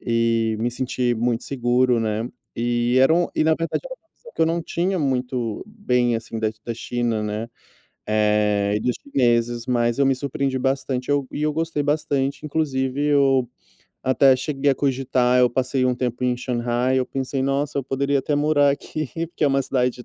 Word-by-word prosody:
e 115 -1 +1
me 120 - 0
senti 125 -1 -1
muito 115 0 -1
seguro, 125 -1 +1
né, 110 +1 -1 0.3
e 120 +1 +1
eram 165 +6 +3
e - - +2
na 160 0 +4
verdade 165 0 -2
era - - -6
um - - -30
impressão 475 +9 -18
que - - +1
eu - - +4
não 170 +1 0
tinha 180 +3 -1
muito 125 - -2
bem, 125 - 0
assim, 115 0 -6
da 110 -1 0
da 115 - -3
China, 120 -1 -2
né, 105 +2 -3 0.6
eh, 105 -1 +2
e - - -2
dos 125 +2 0
chineses, 120 -3 +1
mas 120 0 +1
eu 140 - +4
me 135 - +3
surpreendi 135 0 -2
bastante, 135 0 -1
eu 145 -2 +1
e 150 - -3
eu 150 - +1
gostei 160 -1 -1
bastante, 145 -1 -1
inclusive 140 -3 -1
eu 135 -4 +3 0.5
até 130 0 +4
cheguei 140 +1 0
a - - +2
cogitar, 130 -2 +1
eu 125 - +5
passei 130 +1 0
um 125 - +1
tempo 125 0 -3
em 125 -1 +1
Shanghai, 125 +1 0
eu 130 - 0
pensei: 135 0 -3
"Nossa, 140 +2 -1
eu - - -1
poderia 140 +1 0
até 145 +2 -1
morar 145 -1 +3
aqui", 155 +2 -4 0.2
porque 170 - -2
é - - +5
uma 135 0 +2
cidade 125 -1 -1
130 Hz, 190 wpm, -22 LUFS, 120-140 Hz, 0.6 s, eu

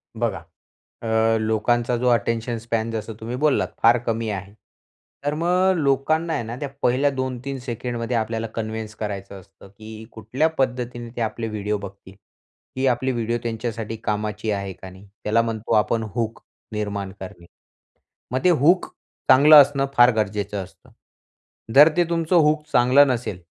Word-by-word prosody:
बघा - - -1 0.6
अ, 110 0 +2
लोकांचा 115 +2 +1
जो 125 +1 0
अटेंशन 115 0 0
स्पॅन 115 0 -2
जसं 110 0 -4
तुम्ही 115 +3 -5
बोललात 150 -3 +2
फार 115 +2 +6
कमी 115 0 -1
आहे. 100 -1 -6 0.7
तर 145 +1 0
मग 180 +3 +2
लोकांना 155 +3 +1
आहे 140 - -1
ना 115 +2 -6
त्या 145 - -3
पहिल्या 130 +4 +2
2-3 130 0 -4
सेकंडमध्ये 120 -1 -3
आपल्याला 115 0 -2
कन्विन्स 110 -1 -5
करायचं 100 -2 -6
असतं 95 +1 -18
की 110 +2 -11
कुठल्या 120 +8 -1
पद्धतीने 125 -2 -2
ते - - -4
आपले 115 0 -2
व्हिडिओ 105 -1 -2
बघतील. 100 -1 -11 0.6
ही 130 +1 0
आपली 130 +1 +1
व्हिडिओ 120 -1 -1
त्यांच्यासाठी 115 -1 -4
कामाची 105 +1 -2
आहे 100 -2 -3
का 95 +1 -11
नाही. 95 +2 -15 0.2
त्याला 115 +2 +3
म्हणतो 115 -1 -4
आपण 110 +1 +2
हूक 115 -1 -3 0.3
निर्माण 100 -2 -3
करणे. 90 -2 -10 0.8
मग 130 +2 -2
ते 180 - +6
हूक 170 +3 +3 0.4
चांगलं 145 +4 +8
असणं 140 0 -1
फार 120 0 +7
गरजेचं 105 -1 -2
असतं. - - -20 0.8
जर 145 +3 +9
ते 175 - +4
तुमचं 165 +1 +1
हूक 150 -1 +3
चांगलं 125 +4 +6
नसेल 115 -8 -3
115 Hz, 155 wpm, -22 LUFS, 110-130 Hz, 0.8 s, जर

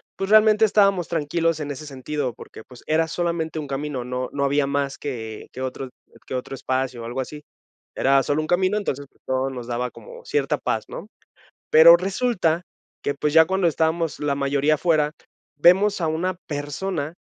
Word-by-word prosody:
pues 195 - -4
realmente 215 0 +6
estábamos 195 -5 +3
tranquilos 165 0 0
en 145 -1 -4
ese 145 +2 -7
sentido, 135 -1 -4
porque 110 - -12
pues, 125 0 -16
era 160 +1 +2
solamente 165 -1 -2
un 150 - -5
camino, 135 -2 -4
no 125 0 -3
no 140 0 -1
había 140 +1 +2
más 140 -1 -1
que 110 -6 -6
que 130 - -8
otro 130 0 -4 0.4
que - - -4
otro 125 +1 -5
espacio 130 -2 -2
o - - -6
algo 120 +3 -5
así, 150 +3 -8 0.5
era 135 0 +3
sólo 145 +3 0
un 155 - -5
camino, 185 +4 +2
entonces 145 -9 -3
pues, - - -34
todo 130 +1 0
nos 125 -3 -7
daba 125 +1 -2
como - - -13
cierta 445 -2 0
paz, - - -2
¿no? - - -8 0.6
Pero 165 +2 +9
resulta, 185 -3 0 0.4
que 140 - 0
pues 150 +1 -1
ya 160 0 +7
cuando 190 +1 +1
estábamos 160 -1 0
la 145 -1 0
mayoría 140 +2 +1
afuera, 155 -2 +1 0.5
vemos 190 +6 +4
a 165 - +1
una 165 +4 -1
persona 145 +2 -3
150 Hz, 185 wpm, -23 LUFS, 135-175 Hz, 0.6 s, Pero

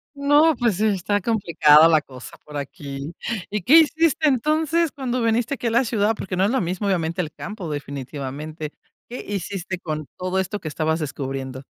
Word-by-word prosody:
No, 290 +2 +4
pues 230 -5 0
está 205 -1 +1
complicada 165 -7 +5
la 160 -2 +5
cosa 130 -3 -12
por 150 - -11
aquí. 140 +1 -6 0.4
¿Y 210 -2 -3
qué 315 - +8
hiciste 320 0 +2
entonces, 310 +4 +1
cuando 255 -3 -2
viniste 230 +4 +1
aquí - - -8
a - - 0
la 235 +3 +3
ciudad? 215 -1 +1
Porque 185 -3 -5
no 190 - +3
es 205 - +1
lo 265 -4 +1
mismo, 185 +4 -3
obviamente 170 -3 -1
el 160 -3 -5
campo 195 0 -7
definitivamente, 145 +2 -6 0.4
¿qué 245 - -7
hiciste 190 -2 -4
con 155 -3 -4
todo 185 +1 -2
esto 190 +2 -2
que 155 - -7
estabas 160 +1 -1
descubriendo? 135 -2 -5
185 Hz, 180 wpm, -22 LUFS, 155-235 Hz, 0.4 s, qué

